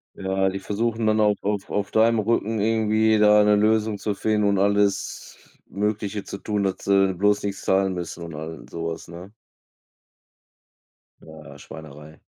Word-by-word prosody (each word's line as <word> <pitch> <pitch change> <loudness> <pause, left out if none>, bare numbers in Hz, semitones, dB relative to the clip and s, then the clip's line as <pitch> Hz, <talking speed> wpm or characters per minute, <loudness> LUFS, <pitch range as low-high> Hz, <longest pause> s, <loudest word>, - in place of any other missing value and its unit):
Ja, 95 0 0
die 95 +1 -5
versuchen 110 +3 -2
dann 110 0 +2
auch 105 -1 +3
auf 100 -1 -2
auf 100 0 -2
deinem 115 +1 +3
Rücken 110 0 0
irgendwie 110 0 +2
da 105 0 +6
'ne 105 0 +4
Lösung 110 0 +1
zu 105 -1 -2
finden 105 0 0
und 100 -1 +2
alles 100 0 0 0.3
Mögliche 105 0 -3
zu 100 - -8
tun, 105 -2 -2
dass 95 -1 -1
sie 95 -1 +3
bloß 105 +3 +1
nix 100 -1 -4
zahlen 95 0 +1
müssen 85 -1 -6
und 85 -1 -8
all 80 -3 -8
sowas, 80 0 -5
ne? 85 +3 -11 1.9
Ja, 75 -3 -13
Schweinerei. 75 +1 -12
100 Hz, 155 wpm, -23 LUFS, 95-105 Hz, 1.9 s, da